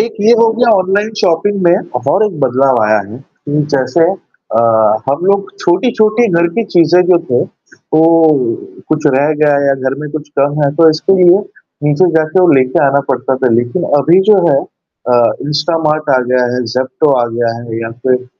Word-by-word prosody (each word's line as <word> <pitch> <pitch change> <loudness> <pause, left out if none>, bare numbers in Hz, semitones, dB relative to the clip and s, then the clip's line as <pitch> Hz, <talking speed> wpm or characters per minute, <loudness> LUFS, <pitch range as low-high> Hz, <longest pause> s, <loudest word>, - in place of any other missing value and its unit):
एक 230 - -2
ये 215 +3 +3
हो 230 0 +3
गया 240 +1 0
ऑनलाइन 200 +3 0
शॉपिंग 195 +4 0
में 175 +4 +1 0.2
और 205 +3 +2
एक 190 -7 -7
बदलाव 130 -1 +1
आया 105 0 +2
है 100 +3 -10
कि 145 +2 -5
जैसे 135 +5 -1 0.5
अ, 115 - +2 0.5
हम 140 +6 -1
लोग 200 0 +1
छोटी-छोटी 220 +4 +1
घर 170 - +2
की 230 - 0
चीज़ें 175 -2 +2
जो 180 -1 +4
थे 120 - +1 0.3
तो 155 - -2 0.9
कुछ 155 0 -1
रह 145 +3 +1
गया 150 - +3 0.2
या 140 - +2
घर 130 - -3
में 150 - -6
कुछ 150 -1 -7
कम 145 +2 0
है 140 - +1
तो 165 -1 +5
इसके 155 +5 0
लिए 175 +1 +5 0.5
नीचे 150 +5 +2
जाके 155 +3 +1
वो 180 - +4
लेके 130 +1 +1
आना 140 +1 +1
पड़ता 135 - -2
था। 130 0 0
लेकिन 120 +9 -1 0.2
अभी 165 +7 +3
जो 210 - +6
है 140 - +2
अ, 125 - -9 0.3
इंस्टामार्ट 155 0 -1
आ - - +3
गया 125 0 0
है, 125 - -2
ज़ेप्टो 130 +4 -1
आ - - +1
गया 115 -1 -1
है 115 -1 -7
या 115 - -6 0.2
फिर 125 0 0
155 Hz, 190 wpm, -12 LUFS, 130-180 Hz, 0.9 s, जो